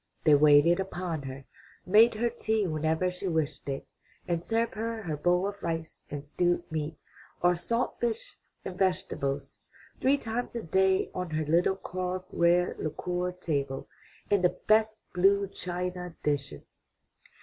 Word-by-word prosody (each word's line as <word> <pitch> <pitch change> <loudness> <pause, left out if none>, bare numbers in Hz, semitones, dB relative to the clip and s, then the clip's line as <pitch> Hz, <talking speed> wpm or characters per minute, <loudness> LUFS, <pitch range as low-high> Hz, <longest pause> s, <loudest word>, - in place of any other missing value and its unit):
They 155 - +6
waited 150 +4 +6
upon 180 -4 -3
her, 135 +1 -9 0.4
made 220 +4 +6
her 235 +2 0
tea 220 -2 0
whenever 160 +2 0
she 180 +2 -5
wished 160 -4 -1
it, 135 - -3 0.4
and 170 -1 0
served 225 +5 0
her 225 0 -3
her 160 -4 -2
bowl 175 +5 +2
of 200 0 -6
rice 165 -1 -4
and 145 0 -6
stewed 175 +3 +1
meat, 155 0 -3 0.5
or 175 0 +5
salt 230 +8 -1
fish 235 -2 -2 0.3
and 185 -1 -6
vegetables, 180 -7 -1 0.4
three 275 +2 +3
times 240 -1 -4
a 235 - -3
day 190 +3 +2
on 180 -1 -3
her 155 0 -1
little 170 +5 +3
carved 185 -1 -4
red 175 +1 +2
lacquer 180 +3 -2
table 140 -7 -3 0.4
in 200 -2 +4
the 180 - +2
best 220 0 +3
blue 200 +2 +4
china 180 -1 -4
dishes. 140 - -3
180 Hz, 150 wpm, -29 LUFS, 160-200 Hz, 0.5 s, They